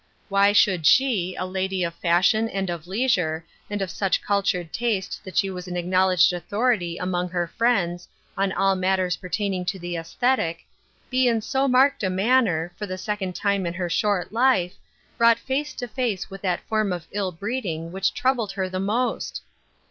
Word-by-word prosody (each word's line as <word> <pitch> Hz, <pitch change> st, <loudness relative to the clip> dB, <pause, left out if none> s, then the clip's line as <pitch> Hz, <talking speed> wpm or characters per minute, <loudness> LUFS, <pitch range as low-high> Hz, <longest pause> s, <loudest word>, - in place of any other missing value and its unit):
Why 200 Hz, 0 st, +4 dB
should 185 Hz, -6 st, +3 dB
she, 210 Hz, -, +3 dB
a 185 Hz, -, -3 dB
lady 190 Hz, 0 st, -2 dB
of 170 Hz, -1 st, -2 dB
fashion 180 Hz, +7 st, +2 dB
and 195 Hz, -3 st, -2 dB
of 170 Hz, -1 st, -6 dB
leisure, 180 Hz, -7 st, 0 dB, 0.2 s
and 205 Hz, -1 st, -2 dB
of 185 Hz, -, -4 dB
such 195 Hz, -2 st, 0 dB
cultured 195 Hz, -5 st, -1 dB
taste 215 Hz, -5 st, -2 dB
that 190 Hz, -, -8 dB
she 195 Hz, -, +2 dB
was 180 Hz, 0 st, -7 dB
an 180 Hz, 0 st, -4 dB
acknowledged 185 Hz, 0 st, +3 dB
authority 180 Hz, 0 st, 0 dB
among 180 Hz, -1 st, -2 dB
her 175 Hz, 0 st, -1 dB
friends, 180 Hz, -4 st, 0 dB, 0.3 s
on 195 Hz, 0 st, 0 dB
all 195 Hz, 0 st, +2 dB
matters 185 Hz, -1 st, +1 dB
pertaining 185 Hz, +1 st, -2 dB
to 190 Hz, -, -2 dB
the 175 Hz, -1 st, -5 dB
esthetic, 170 Hz, 0 st, -1 dB, 0.5 s
be 255 Hz, 0 st, +3 dB
in 230 Hz, -2 st, +2 dB
so 265 Hz, +5 st, 0 dB
marked 265 Hz, +2 st, +4 dB
a 190 Hz, -, 0 dB
manner, 185 Hz, -4 st, +2 dB
for 210 Hz, -, -5 dB
the 185 Hz, 0 st, -4 dB
second 190 Hz, -2 st, -3 dB
time 200 Hz, -3 st, 0 dB
in 170 Hz, -, -4 dB
her 175 Hz, -1 st, -3 dB
short 205 Hz, -2 st, 0 dB
life, 230 Hz, -7 st, +3 dB, 0.5 s
brought 230 Hz, -1 st, +6 dB
face 280 Hz, +4 st, -2 dB
to 245 Hz, -, -5 dB
face 215 Hz, -5 st, -2 dB
with 195 Hz, -, -8 dB
that 180 Hz, -3 st, -1 dB
form 215 Hz, -3 st, 0 dB
of 175 Hz, -3 st, -4 dB
ill 195 Hz, -2 st, -2 dB
breeding 175 Hz, -4 st, -4 dB
which 190 Hz, +1 st, 0 dB
troubled 245 Hz, -6 st, 0 dB
her 190 Hz, -2 st, -2 dB
the 185 Hz, 0 st, -4 dB
most 225 Hz, +6 st, -1 dB
190 Hz, 180 wpm, -24 LUFS, 180-220 Hz, 0.5 s, brought